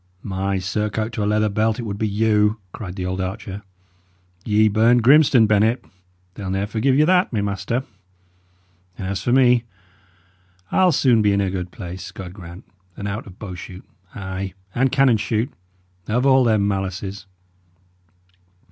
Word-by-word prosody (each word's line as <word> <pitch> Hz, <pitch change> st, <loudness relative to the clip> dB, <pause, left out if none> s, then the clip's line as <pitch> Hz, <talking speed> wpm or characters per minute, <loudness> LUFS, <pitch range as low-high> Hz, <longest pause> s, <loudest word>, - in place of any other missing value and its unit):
"My 95 Hz, 0 st, -2 dB
surcoat 105 Hz, +3 st, -2 dB
to 105 Hz, -, -2 dB
a -, -, 0 dB
leather 105 Hz, 0 st, +2 dB
belt, 110 Hz, +2 st, 0 dB
it 120 Hz, -, -4 dB
would 100 Hz, -2 st, -5 dB
be 110 Hz, -, 0 dB
you!" 105 Hz, +1 st, +2 dB, 0.2 s
cried 95 Hz, -4 st, -7 dB
the 90 Hz, -2 st, -4 dB
old 95 Hz, +1 st, -2 dB
archer. 95 Hz, +1 st, -5 dB, 0.8 s
"Ye 110 Hz, 0 st, +3 dB
burned 115 Hz, +3 st, +3 dB
Grimstone, 135 Hz, -3 st, +6 dB
Bennet 110 Hz, +3 st, +2 dB, 0.5 s
they'll 100 Hz, -1 st, -6 dB
ne'er 95 Hz, +1 st, -1 dB
forgive 115 Hz, +5 st, +1 dB
you 150 Hz, -, +5 dB
that, 180 Hz, +2 st, +3 dB
my 110 Hz, -, -1 dB
master. 100 Hz, +5 st, -2 dB, 1.1 s
And 95 Hz, -, -5 dB
as 95 Hz, -1 st, -3 dB
for 120 Hz, -, -1 dB
me, 125 Hz, -2 st, +4 dB, 1.1 s
I'll 185 Hz, -1 st, +4 dB
soon 125 Hz, -8 st, +3 dB
be 105 Hz, -1 st, +3 dB
in 100 Hz, -, +1 dB
a 95 Hz, -2 st, -1 dB
good 90 Hz, -1 st, -4 dB
place, 90 Hz, 0 st, -8 dB
God 90 Hz, -2 st, -9 dB
grant, 90 Hz, -2 st, -11 dB, 0.3 s
and 100 Hz, -, -4 dB
out 105 Hz, +3 st, -5 dB
of 95 Hz, -1 st, -13 dB
bow 100 Hz, -4 st, -7 dB
shoot 90 Hz, +1 st, -10 dB, 0.3 s
ay, 95 Hz, 0 st, -5 dB, 0.2 s
and 130 Hz, +1 st, +1 dB
cannon 135 Hz, -4 st, +4 dB
shoot 110 Hz, +3 st, -2 dB, 0.5 s
of 125 Hz, +5 st, 0 dB
all 130 Hz, -1 st, +5 dB
their 110 Hz, -2 st, +3 dB
malices. 95 Hz, 0 st, -3 dB
105 Hz, 165 wpm, -21 LUFS, 95-115 Hz, 1.1 s, Grimstone